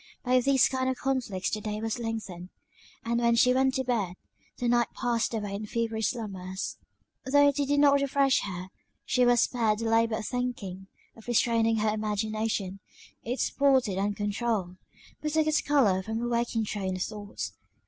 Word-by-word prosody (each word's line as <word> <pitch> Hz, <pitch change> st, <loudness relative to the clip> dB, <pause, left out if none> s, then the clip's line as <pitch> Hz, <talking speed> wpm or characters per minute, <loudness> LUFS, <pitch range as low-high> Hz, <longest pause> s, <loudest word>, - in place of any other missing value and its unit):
By 255 Hz, 0 st, +3 dB
these 265 Hz, 0 st, +4 dB
kind 260 Hz, -1 st, -1 dB
of 260 Hz, -, -2 dB
conflicts 250 Hz, -8 st, -1 dB
the 215 Hz, -, -2 dB
day 210 Hz, 0 st, -3 dB
was 225 Hz, +2 st, -3 dB
lengthened; 215 Hz, -6 st, -5 dB, 0.6 s
and 235 Hz, +1 st, 0 dB
when 235 Hz, -1 st, +3 dB
she 250 Hz, +2 st, +5 dB
went 265 Hz, +1 st, +2 dB
to 265 Hz, -, 0 dB
bed, 215 Hz, -8 st, -1 dB, 0.4 s
the 245 Hz, -, -1 dB
night 240 Hz, 0 st, +3 dB
passed 235 Hz, -3 st, 0 dB
away 210 Hz, -3 st, -3 dB
in 210 Hz, +2 st, -5 dB
feverish 225 Hz, -1 st, -1 dB
slumbers; 190 Hz, -5 st, -5 dB, 0.5 s
though 285 Hz, +2 st, +5 dB
they 285 Hz, 0 st, -1 dB
did 285 Hz, +1 st, +2 dB
not 280 Hz, -1 st, +5 dB
refresh 275 Hz, -1 st, +3 dB
her, 185 Hz, -2 st, -5 dB, 0.4 s
she 250 Hz, -1 st, +3 dB
was 240 Hz, -1 st, +5 dB
spared 225 Hz, -4 st, +1 dB
the 230 Hz, -, -4 dB
labour 225 Hz, 0 st, +2 dB
of 215 Hz, -, -5 dB
thinking, 240 Hz, -7 st, -4 dB, 0.3 s
of 225 Hz, -, -16 dB
restraining 230 Hz, -1 st, +2 dB
her 215 Hz, 0 st, +1 dB
imagination; 215 Hz, -2 st, -2 dB, 0.4 s
it 245 Hz, +3 st, -4 dB
sported 260 Hz, -9 st, +2 dB
uncontrouled; 205 Hz, -1 st, -1 dB, 0.4 s
but 300 Hz, -1 st, -2 dB
took 315 Hz, -1 st, +3 dB
its 310 Hz, -1 st, +2 dB
colour 230 Hz, -11 st, +3 dB
from 220 Hz, +3 st, -4 dB
her 240 Hz, +1 st, -2 dB
waking 235 Hz, -1 st, 0 dB
train 195 Hz, -3 st, -3 dB
of 185 Hz, -, -1 dB
thoughts. 205 Hz, -2 st, -6 dB
230 Hz, 175 wpm, -28 LUFS, 210-255 Hz, 0.6 s, she